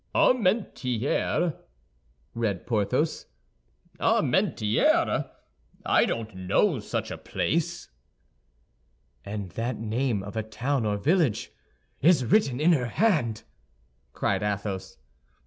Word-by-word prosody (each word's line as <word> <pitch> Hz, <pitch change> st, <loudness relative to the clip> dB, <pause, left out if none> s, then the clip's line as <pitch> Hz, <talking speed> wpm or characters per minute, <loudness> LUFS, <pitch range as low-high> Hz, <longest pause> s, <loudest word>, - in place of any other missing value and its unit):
"Armentières," 175 Hz, -, +1 dB, 0.8 s
read 110 Hz, -6 st, -2 dB
Porthos; 105 Hz, -4 st, 0 dB, 0.7 s
"Armentières? 105 Hz, +1 st, +2 dB, 0.6 s
I -, -, +4 dB
don't 110 Hz, -3 st, -4 dB
know 100 Hz, -, +1 dB
such 105 Hz, -, -4 dB
a -, -, -6 dB
place." 170 Hz, +2 st, -2 dB, 1.4 s
"And 100 Hz, -1 st, -5 dB
that 115 Hz, +4 st, -3 dB
name 115 Hz, -1 st, -1 dB
of 100 Hz, +2 st, -8 dB
a 110 Hz, -, 0 dB
town 115 Hz, +3 st, -2 dB
or 105 Hz, -1 st, 0 dB
village 150 Hz, -, +1 dB, 0.5 s
is 155 Hz, -4 st, +4 dB
written 135 Hz, -, +2 dB
in 160 Hz, +4 st, +4 dB
her 130 Hz, -7 st, +2 dB
hand!" 125 Hz, -, +1 dB, 0.7 s
cried -, -, -1 dB
Athos. 100 Hz, -2 st, -3 dB
115 Hz, 95 wpm, -26 LUFS, 105-155 Hz, 1.4 s, I